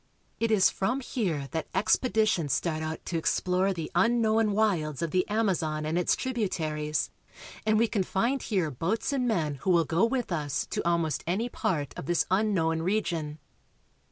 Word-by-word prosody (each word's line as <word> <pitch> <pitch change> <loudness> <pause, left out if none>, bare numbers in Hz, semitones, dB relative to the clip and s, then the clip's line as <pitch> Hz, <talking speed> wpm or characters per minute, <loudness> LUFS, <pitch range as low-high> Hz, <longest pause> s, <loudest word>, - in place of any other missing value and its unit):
It 230 - +1
is 210 -4 +4
from 250 +8 -1
here 175 - -2
that 160 -1 -3
expeditions 210 - +2
start 160 0 -1
out 160 0 -5
to 170 - -1
explore 185 +4 +1
the 165 -4 -5
unknown 220 +2 +3
wilds 170 -8 0
of 165 - -2
the 185 +2 +1
Amazon 175 -8 0
and 155 +2 -1
its 180 0 +2
tributaries, 160 - -2 0.6
and 215 0 +4
we 230 +2 +3
can 215 -3 0
find 235 +9 0
here 185 -8 -1
boats 190 - -1
and 255 -3 0
men 155 - 0
who - - -2
will 170 -2 +4
go 165 +6 +1
with 240 -2 0
us 150 -4 -1
to - - -1
almost 165 -3 0
any 210 +8 0
part 150 - -2
of - - -7
this 175 -1 +2
unknown 185 -5 +1
region. 170 -5 -1
180 Hz, 170 wpm, -28 LUFS, 160-220 Hz, 0.6 s, is